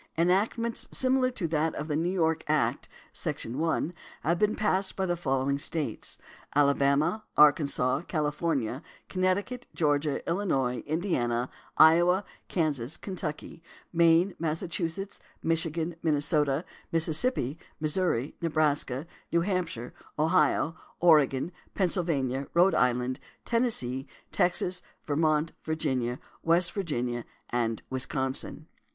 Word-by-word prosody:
Enactments 205 +7 +1
similar 260 0 +3
to 205 -9 -3
that 160 0 0
of 150 - -4
the 150 - -1
New 165 +3 +1
York 160 -3 +1
Act, 150 0 0 0.2
sec. - - -2
1, 160 +6 -1 0.3
have 170 +3 +1
been 210 0 +2
passed 195 -2 +1
by 190 - 0
the 175 -1 0
following 140 -3 0
States: 145 -5 -2 0.4
Alabama, 140 +7 +3
Arkansas, 145 -4 +4
California, 150 -5 -1 0.3
Connecticut, 195 +7 -1
Georgia, 145 -2 0
Illinois, 135 -10 0
Indiana, 130 -8 0 0.3
Iowa, 175 +5 +6 0.2
Kansas, 150 -6 -1
Kentucky, 165 -4 -5 0.3
Maine, 170 +2 +4
Massachusetts, 170 +3 -3 0.2
Michigan, 165 0 0
Minnesota, 150 -1 +1 0.3
Mississippi, 160 - +1 0.2
Missouri, 155 -4 0
Nebraska, 150 -4 0 0.3
New 170 - +3
Hampshire, 170 - -2 0.2
Ohio, 155 0 +2 0.2
Oregon, 155 -2 +4 0.2
Pennsylvania, 150 -8 0
Rhode 180 +3 +5
Island, 125 +1 +1 0.3
Tennessee, 145 - 0 0.2
Texas, 180 0 +1 0.2
Vermont, 155 +1 +1
Virginia, 130 -6 -1 0.2
West 170 +1 +3
Virginia, 125 - -2 0.3
and 115 -2 -1
Wisconsin. 130 +3 -2
160 Hz, 105 wpm, -28 LUFS, 140-175 Hz, 0.4 s, Iowa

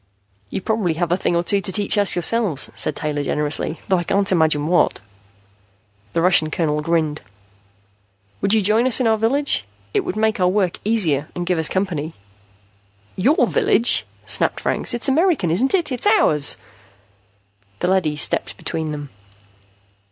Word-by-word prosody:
"You - - -4
probably 210 -6 -1
have 170 0 -2
a - - +3
thing 180 -2 -1
or 170 - +1
two 200 +2 +1
to 190 - -1
teach 205 +1 +2
us 205 -1 +2
yourselves," 180 - 0
said - - 0
Taylor 150 -1 -3
generously, 150 +3 -1
"though 190 -2 +2
I - - -3
can't 195 +3 +1
imagine 155 -4 +1
what." 175 +2 +1 1.1
The 165 - 0
Russian 175 -4 +4
colonel 150 -2 -1
grinned. 155 -2 -1 1.2
"Would 195 - 0
you 215 - +1
join 220 +5 +2
us 255 - +4
in 255 - 0
our 225 -1 +3
village? 265 - +1 0.3
It - - +2
would - - -4
make 220 -1 0
our 180 - +3
work 185 -1 0
easier 170 -10 0
and 175 - -4
give 175 -1 -1
us 160 - +1
company." 170 -5 -3 1.0
"Your 265 - +2
village?" 410 - +3 0.2
snapped - - 0
Franks. - - 0
"It's 240 - -1
American, 295 - +1
isn't 255 - +2
it? 340 -6 0
It's 255 +10 -2
ours!" 155 - +3 1.2
The 175 - -2
leady 180 -5 +1
stepped 150 - 0
between 160 -1 -4
them. 145 -2 -8
180 Hz, 165 wpm, -20 LUFS, 160-220 Hz, 1.2 s, Russian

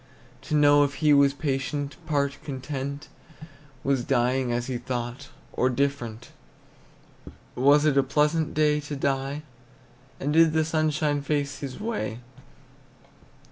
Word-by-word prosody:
To 155 - +1
know 145 -1 +6
if 140 -1 -1
he 150 -1 +3
was 140 -1 +4
patient, 140 0 -2
part 140 -3 0
content, 140 +1 -5 0.8
Was 135 -3 +1
dying 125 0 +1
as 120 0 -1
he 125 -1 -3
thought, 125 +2 -5 0.2
or 130 - +2
different; 125 -4 -2 1.2
Was 145 +4 +4
it 140 -2 +4
a - - +6
pleasant 150 +4 0
day 150 -1 +3
to 150 0 -6
die, 140 +1 -2 0.8
And 145 +2 -1
did 165 0 +5
the 160 0 +2
sunshine 155 -2 0
face 145 -1 -2
his 135 -3 -6
way? 210 - -3
140 Hz, 130 wpm, -26 LUFS, 135-150 Hz, 1.2 s, know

